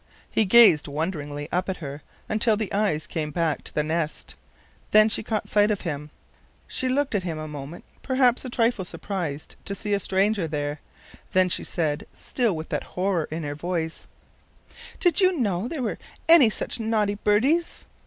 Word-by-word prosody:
He 220 - +2
gazed 195 -8 +7
wonderingly 145 -1 -4
up 180 +2 -1
at 190 - -2
her 145 -2 -7 0.3
until 215 0 +2
the 215 -2 -3
eyes 195 -7 0
came 155 -1 -3
back 160 0 -1
to - - -5
the 150 - +2
nest; 155 0 -2 0.6
then 215 +1 +6
she - - +2
caught 215 0 -3
sight 205 0 +3
of 210 -2 -1
him. 150 -3 -4 0.6
She 260 - -1
looked 280 +1 0
at 205 - +2
him 170 -3 -4
a 155 0 -5
moment, 150 +2 -8 0.2
perhaps 255 -2 +2
a 255 - -5
trifle 235 -4 +1
surprised 175 -6 -5
to 200 - -3
find 205 0 -3
a 200 - +2
stranger 195 -1 +1
there, 145 -1 -3 0.5
then 185 0 +4
she - - 0
said, 150 -3 -2
still 235 -8 -1
with 155 0 -6
that - - -2
horror 180 -3 +1
in 160 +1 -4
her 145 -1 -3
voice: 165 +1 -4 0.9
"Did 350 -1 +3
you 370 -2 +4
know 205 -4 0
there 285 -2 -4
were 220 - -3 0.3
any 325 -8 +8
such 225 - -3
naughty 220 -2 +1
birdies?" 245 +12 +1
190 Hz, 180 wpm, -25 LUFS, 155-220 Hz, 0.9 s, any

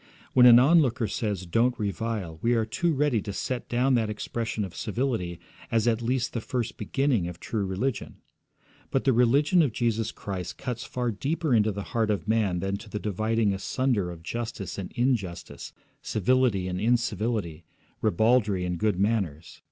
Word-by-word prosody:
When 125 -1 +8
an 120 -1 +10
onlooker 130 -4 +4
says 100 -2 -2
'Don't 115 +8 +1
revile,' 105 -5 -3
we 120 +1 +2
are 115 -1 +1
too 170 +10 0
ready 145 -6 +1
to 100 - -5
set 125 +5 -4
down 125 +2 +2
that 115 -3 +2
expression 110 0 -3
of 90 -3 -10
civility 110 -7 -2 0.3
as 115 0 +1
at 115 -1 +2
least 120 +1 -1
the 115 - -2
first 120 0 -3
beginning 135 -10 0
of 90 0 -8
true 105 -4 -2
religion. 105 +6 -2 0.7
But 135 - 0
the 135 - +3
religion 140 +9 +4
of 140 -8 +1
Jesus 115 -2 0
Christ 95 -3 -6
cuts 125 -1 -4
far 125 -1 -2
deeper 150 - -1
into 110 -2 +3
the 100 0 -5
heart 115 -3 +1
of 100 -4 -1
man 105 -6 +1
than 95 +1 -1
to 110 +1 -12
the 105 - -4
dividing 110 +1 0
asunder 105 0 0
of 85 -2 -9
justice 115 -1 -5
and 95 - -6
injustice, 120 -8 -2 0.3
civility 110 -3 +1
and 90 +1 -3
incivility, 110 -7 0 0.4
ribaldry 105 -2 +2
and 90 -1 -3
good 105 -4 +1
manners. 95 -8 -1
115 Hz, 170 wpm, -27 LUFS, 100-125 Hz, 0.7 s, an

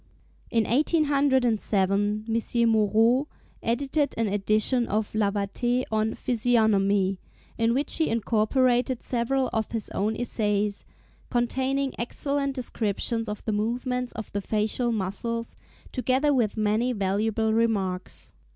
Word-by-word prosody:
In 230 -1 +2
1807 235 - +1
M. 230 +1 +1
Moreau 225 +5 +3 0.3
edited 280 +4 0
an 225 -1 +1
edition 215 +4 +1
of 215 +1 -1
Lavater 215 +4 0
on 220 0 0
Physiognomy, 205 -5 +2 0.4
in 230 +1 +2
which 280 +3 +1
he 320 - +1
incorporated 240 +3 +1
several 255 +2 0
of 220 -1 -1
his 225 -3 -4
own 215 +2 -1
essays, 210 -4 -1 0.4
containing 265 +3 0
excellent 275 +3 -2
descriptions 225 -2 -2
of 210 - -6
the 220 - 0
movements 245 +4 -1
of 220 - -7
the 205 - -2
facial 220 +4 0
muscles, 230 +3 -3 0.4
together 260 +3 +1
with 230 -5 +1
many 215 +4 +1
valuable 220 +2 0
remarks. 200 -5 -1
230 Hz, 115 wpm, -26 LUFS, 210-250 Hz, 0.4 s, Moreau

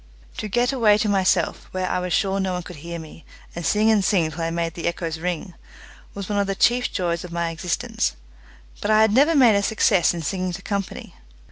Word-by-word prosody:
To 215 - -4
get 240 +5 +1
away 220 -5 +4
to 215 - 0
myself, 190 -3 +1
where 185 0 -3
I - - 0
was 180 0 -4
sure 195 +2 +1
no 190 -1 -1
one 180 0 -3
could 170 -5 -10
bear 170 +1 -6
me, 160 0 -11 0.3
and 170 - -5
sing 210 +6 +3
and 210 -3 +3
sing 175 -5 +2
till 165 +2 -6
I 165 - -1
made 165 -1 -2
the 170 - -4
echoes 165 -2 -3
ring, 180 +2 -4 0.6
was 200 -2 -5
one 205 -1 -1
of 200 - 0
the 195 - -1
chief 245 +5 +2
joys 170 -2 -2
of 180 - -9
my 170 -1 -2
existence, 165 - -2 0.7
but 205 - -2
I 215 0 +5
had 220 -1 +4
never 290 +7 +4
made 250 -6 +6
a 200 - +2
success 200 -4 +3
in 170 - -5
singing 185 +3 -2
to 195 +2 -7
company. 200 -2 -4
185 Hz, 230 wpm, -23 LUFS, 170-210 Hz, 0.7 s, made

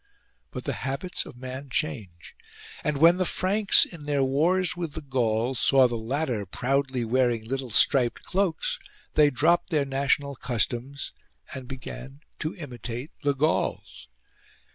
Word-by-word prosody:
But - - -7
the - - -2
habits 140 +7 -3
of - - -12
man 130 +2 -7
change; 110 - -4 0.5
and 150 -1 0
when 165 +4 +6
the 185 - +2
Franks, 195 +3 +4
in 165 -4 -11
their 145 -2 +1
wars 165 +7 +2
with 170 -4 -4
the 160 - -5
Gauls, 125 -3 0
saw 135 -2 +5
the 120 - -5
latter 120 0 -2
proudly 130 +2 0
wearing 120 -1 +1
little 130 +1 -3
striped 120 +2 +3
cloaks, 200 - -1 0.3
they 150 -1 +5
dropped 160 +6 +2
their 150 -4 +1
national 140 +1 0
customs 125 +4 -1 0.4
and 130 -3 -7
began 130 +2 -8 0.2
to 155 - -3
imitate 125 - -7
the 145 -2 +1
Gauls. 135 - -1
135 Hz, 140 wpm, -26 LUFS, 125-155 Hz, 0.5 s, when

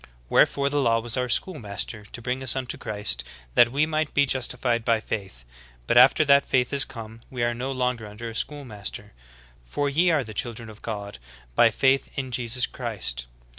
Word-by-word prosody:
Wherefore 140 0 +3
the 145 0 0
law 115 -3 +3
was 115 0 0
otir 125 -2 -1
schoolmaster 105 - -2
to 120 - -8
bring 125 +2 -2
us 130 -2 +1
unto 130 -2 -3
Christ, 105 - -2 0.3
that 120 - +5
we 145 +4 +2
might 155 -1 -2
be 145 - +5
justified 125 -3 +1
by 115 -1 +2
faith. 95 - -6 0.4
But - - +1
after 130 +5 +7
that 140 -1 +6
faith 125 +1 0
is 140 -1 +5
come, 115 -1 -10
we 125 -2 -3
are 120 0 +1
no 125 +3 -4
longer 125 -4 -2
under 105 +3 -8
a 115 - -6
schoolmaster. 120 -5 -5 0.5
For 140 - -2
ye 170 +6 +3
are 160 - +3
all 140 - 0
the 110 - -8
children 115 -1 -4
of 110 - -15
God 100 - -6 0.3
by - - +5
faith 135 +1 +2
in 130 -2 -4
Jesus 120 0 0
Christ. 95 - -3
120 Hz, 195 wpm, -25 LUFS, 110-135 Hz, 0.5 s, after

